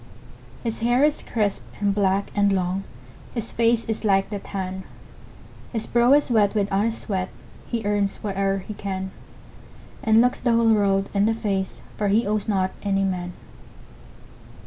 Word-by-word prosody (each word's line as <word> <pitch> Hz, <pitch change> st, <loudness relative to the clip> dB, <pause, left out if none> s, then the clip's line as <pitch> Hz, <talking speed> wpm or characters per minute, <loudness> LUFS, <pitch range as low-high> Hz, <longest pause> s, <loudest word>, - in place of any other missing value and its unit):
His 230 Hz, -2 st, -3 dB
hair 240 Hz, +4 st, +3 dB
is 300 Hz, 0 st, 0 dB
crisp, 210 Hz, -3 st, -1 dB, 0.2 s
and 200 Hz, -1 st, +2 dB
black, 195 Hz, -1 st, +1 dB
and 200 Hz, -1 st, +3 dB
long, 190 Hz, 0 st, 0 dB, 0.5 s
His 230 Hz, -, -3 dB
face 230 Hz, 0 st, +2 dB
is 220 Hz, 0 st, -3 dB
like 195 Hz, -1 st, +2 dB
the 205 Hz, -, -3 dB
tan; 190 Hz, -1 st, -5 dB, 0.9 s
His 225 Hz, -2 st, -2 dB
brow 240 Hz, +2 st, +4 dB
is 290 Hz, -3 st, +3 dB
wet 210 Hz, -2 st, +3 dB
with 205 Hz, -1 st, +1 dB
honest 220 Hz, +4 st, +1 dB
sweat, 185 Hz, -4 st, -2 dB, 0.4 s
He 230 Hz, -3 st, -3 dB
earns 205 Hz, -1 st, +1 dB
whate'er 195 Hz, -1 st, 0 dB
he 215 Hz, -, -4 dB
can, 190 Hz, -2 st, -4 dB, 0.9 s
And 220 Hz, 0 st, +5 dB
looks 250 Hz, +1 st, +3 dB
the 240 Hz, -2 st, +2 dB
whole 230 Hz, -1 st, +4 dB
world 195 Hz, -2 st, +2 dB
in 200 Hz, +1 st, +3 dB
the 225 Hz, -, +2 dB
face, 195 Hz, -4 st, -2 dB, 0.2 s
For 210 Hz, -, 0 dB
he 215 Hz, +4 st, +3 dB
owes 210 Hz, +1 st, -1 dB
not 190 Hz, -3 st, +1 dB
any 195 Hz, -1 st, +1 dB
man. 180 Hz, -2 st, -2 dB
205 Hz, 165 wpm, -24 LUFS, 195-225 Hz, 0.9 s, And